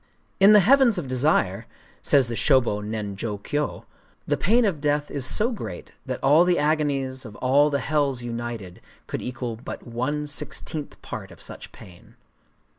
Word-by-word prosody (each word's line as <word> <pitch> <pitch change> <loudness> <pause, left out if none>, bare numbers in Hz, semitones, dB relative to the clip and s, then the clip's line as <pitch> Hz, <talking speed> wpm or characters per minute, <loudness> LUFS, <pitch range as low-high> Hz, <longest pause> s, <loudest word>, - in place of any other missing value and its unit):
In 195 +2 +8
the 210 - +8
Heavens 250 0 +5
of 165 -6 -3
Desire, 130 -7 +1 0.3
says 135 -4 +3
the 120 - -4
Shōbō 120 -5 +2
nen 105 -2 -4
jō 105 0 -4
kyō, 145 +6 -3 0.4
the - - +1
pain 230 +4 +3
of 170 -8 -1
death 145 0 0
is 135 -2 -2
so 225 - +1
great 95 - -7 0.2
that - - -3
all 150 +5 +6
the 180 -1 +2
agonies 145 -4 0
of 110 -4 -10
all 140 +5 +3
the 140 - 0
hells 140 -4 0
united 115 -6 -6 0.2
could - - -5
equal 125 -2 -5
but 120 - -8
one 130 +5 -2
sixteenth 150 0 -5
part 105 -6 -7
of 85 - -15
such - - -8
pain. 90 -1 -15
135 Hz, 170 wpm, -24 LUFS, 115-150 Hz, 0.4 s, In